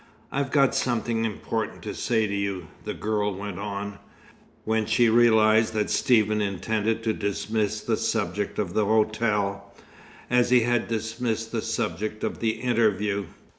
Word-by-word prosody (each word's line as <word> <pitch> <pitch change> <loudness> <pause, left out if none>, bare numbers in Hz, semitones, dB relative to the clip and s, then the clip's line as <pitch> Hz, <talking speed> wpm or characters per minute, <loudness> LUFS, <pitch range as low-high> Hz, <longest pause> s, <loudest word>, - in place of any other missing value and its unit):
"I've 140 0 -1
got 140 -2 +3
something 115 -2 0
important 110 -2 -3
to - - -4
say 110 -2 +1
to 100 - -3
you," 100 -4 -3 0.2
the - - -4
girl 105 -2 -1
went 100 -1 -6
on, 100 0 -5 0.7
when 110 0 0
she 120 -2 +4
realized 110 -1 +5
that 105 -1 0
Stephen 110 -3 +3
intended 110 +3 -1
to 110 -1 +1
dismiss 105 +1 -1
the - - 0
subject 95 +3 -1
of 95 -4 -2
the 110 - +2
hotel, 105 -2 0 0.5
as 125 0 +3
he 125 -1 +5
had 120 0 +1
dismissed 115 0 -2
the 115 - -1
subject 110 -1 -3
of - - -2
the 110 -1 +1
interview. 105 -4 +1
110 Hz, 150 wpm, -25 LUFS, 100-115 Hz, 0.7 s, realized